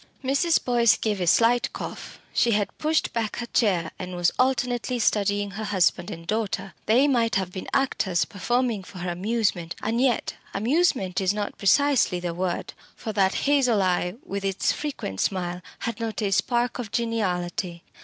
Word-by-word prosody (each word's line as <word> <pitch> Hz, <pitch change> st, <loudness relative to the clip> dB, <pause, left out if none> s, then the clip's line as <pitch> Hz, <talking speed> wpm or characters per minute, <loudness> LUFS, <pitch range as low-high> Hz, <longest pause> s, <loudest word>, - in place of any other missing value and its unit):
Mrs. 280 Hz, +6 st, +2 dB
Boyce 235 Hz, -3 st, +4 dB
gave 210 Hz, -4 st, -1 dB
a 175 Hz, -, 0 dB
slight 235 Hz, +6 st, +4 dB
cough -, -, -7 dB
she 235 Hz, -, +3 dB
had 205 Hz, -1 st, 0 dB
pushed 315 Hz, +1 st, +1 dB
back 225 Hz, -2 st, -1 dB
her 240 Hz, -, -3 dB
chair, 185 Hz, -9 st, +1 dB
and 185 Hz, -1 st, -5 dB
was 175 Hz, -1 st, +2 dB
alternately 250 Hz, -1 st, +1 dB
studying 205 Hz, -2 st, +1 dB
her 215 Hz, +2 st, -5 dB
husband 190 Hz, -3 st, +1 dB
and 165 Hz, 0 st, -8 dB
daughter. 200 Hz, -1 st, -2 dB
They 250 Hz, +6 st, +5 dB
might 235 Hz, -5 st, +2 dB
have 190 Hz, -2 st, 0 dB
been 185 Hz, -, -6 dB
actors 215 Hz, -10 st, +1 dB
performing 240 Hz, +1 st, -1 dB
for 185 Hz, 0 st, -12 dB
her 180 Hz, 0 st, -3 dB
amusement. 185 Hz, -2 st, -1 dB
And 230 Hz, +2 st, -1 dB
yet, 255 Hz, -4 st, +1 dB, 0.2 s
amusement 220 Hz, -, +1 dB
is 190 Hz, +2 st, +1 dB
not 205 Hz, -1 st, -4 dB
precisely 255 Hz, -3 st, +3 dB
the 175 Hz, -1 st, -3 dB
word. 180 Hz, 0 st, -3 dB, 0.2 s
For 220 Hz, -, -5 dB
that 195 Hz, -2 st, +2 dB
hazel 255 Hz, -8 st, +3 dB
eye, 180 Hz, 0 st, 0 dB
with 200 Hz, 0 st, -4 dB
its 195 Hz, -1 st, +1 dB
frequent 265 Hz, -, -4 dB
smile, 180 Hz, -2 st, -1 dB, 0.2 s
had 230 Hz, 0 st, -3 dB
not 225 Hz, -1 st, -3 dB
a 200 Hz, -, 0 dB
spark 240 Hz, +5 st, +1 dB
of 225 Hz, -5 st, -5 dB
geniality. 180 Hz, -6 st, -2 dB
210 Hz, 170 wpm, -25 LUFS, 185-240 Hz, 0.2 s, They